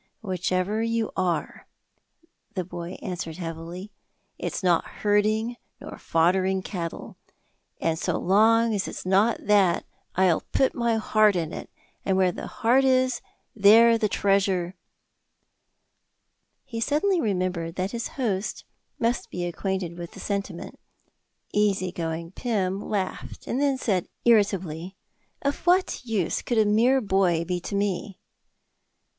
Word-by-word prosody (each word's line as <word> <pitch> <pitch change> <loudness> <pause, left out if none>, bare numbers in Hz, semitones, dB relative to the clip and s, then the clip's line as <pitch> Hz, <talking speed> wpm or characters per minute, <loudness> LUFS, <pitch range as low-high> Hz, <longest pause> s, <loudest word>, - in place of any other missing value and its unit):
"Whichever 185 +1 -1
you 230 -1 0
are," 180 -3 -2 0.9
the 185 - -1
boy 175 0 -7
answered 175 -5 -5
heavily, 170 +3 -6 0.5
"it's - - -3
not 175 -2 +3 0.2
herding 215 +3 +2 0.2
nor - - -9
foddering 185 +3 +2
cattle, 170 -4 -6 0.6
and 160 -1 0
so - - -1
long 225 +4 +4
as 200 -2 -1
it's - - -7
not 200 +5 +2
that, 200 -4 +3 0.3
I'll 185 -3 +3
put 265 - +3
my 235 -2 +1
heart 215 -2 +3
in 165 -2 -2
it, - - -7 0.3
and 190 -1 +1
where 185 -1 +3
the - - -7
heart 245 +4 +2
is, 255 -1 +2 0.3
there 225 +3 +7
the 215 - +1
treasure 195 -3 +1 1.0
" - - -50 0.7
He 235 -4 -5
suddenly 330 - +2
remembered 180 -5 -1
that 190 +2 -2
his 235 0 -3
host 210 -6 -2 0.3
must 235 +1 -1
be 175 0 -3
acquainted 175 0 -3
with 170 -1 -7
the - - -11
sentiment. 200 -3 -4 0.7
Easy 195 -3 +1
going 165 0 -4
Pym 195 -4 -1
laughed, 195 -3 -4
then 275 +1 +1
said 195 -8 0 0.2
irritably, 190 -6 +2 0.5
"Of 280 0 0
what 365 -4 +3
use 215 -8 -1
could 240 - -2
a 220 - +5
mere 235 +6 +4
boy 190 -5 +2
be 180 +1 -2
to 190 - -5
me?" 200 -1 -2
195 Hz, 130 wpm, -25 LUFS, 180-225 Hz, 1.0 s, there